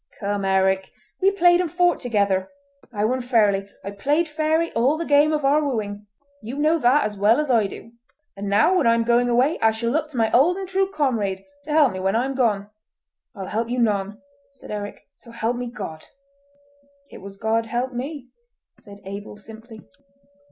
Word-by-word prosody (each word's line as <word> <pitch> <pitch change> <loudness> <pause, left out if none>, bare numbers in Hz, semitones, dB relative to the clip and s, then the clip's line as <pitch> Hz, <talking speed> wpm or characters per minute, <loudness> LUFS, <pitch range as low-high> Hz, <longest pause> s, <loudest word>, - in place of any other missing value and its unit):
Come, 200 -1 -2
Eric! 190 0 +1 0.3
we 385 - +5
played 355 -3 +4
and 345 -4 -3
fought 355 0 +2
together. 200 -6 0 0.4
I 210 -2 -1
won 255 +3 0
fairly. 210 -5 +1
I 200 - -5
played 290 +11 0
fairly 315 +2 0
all 255 +7 +2
the 335 - -3
game 290 +1 +4
of 300 -2 -1
our 295 +2 +3
wooing! 210 -6 -4 0.3
You 235 +6 -7
know 310 +3 +2
that 260 +3 +4
as 210 -1 -4
well 215 +5 +4
as 300 -3 0
I 225 -4 +3
do; 230 - -11 0.4
and 200 0 -5
now 215 - +3
when 300 -9 +2
I 230 - +5
am 230 - +1
going 240 +1 +2
away, 255 +6 +2
I 225 - +4
shall 225 +1 -2
look 310 +2 -1
to 280 - -9
my 225 -1 +1
old 330 +9 +4
and 385 -1 -5
true 385 +1 0
comrade 225 - -1 0.2
to - - -12
help 300 -5 +4
me 185 - -5
when 190 +2 0
I 240 +3 +1
am 270 - -3
gone!" 210 -6 0 0.6
"I'll 195 - -6
help 225 +4 -3
you 250 - -2
none," 205 -3 0 0.4
said - - -12
Eric, 205 -1 -6
"so 235 - -18
help 230 +1 -2
me 245 0 -4
God!" 195 -10 -8 1.0
"It - - -11
was 195 +1 -11
God 225 +1 0
helped 245 +3 -2
me," 260 +1 -6 0.5
said 200 -2 -14
Abel 200 +2 -8
simply. 220 +1 -13
235 Hz, 200 wpm, -22 LUFS, 205-290 Hz, 1.0 s, we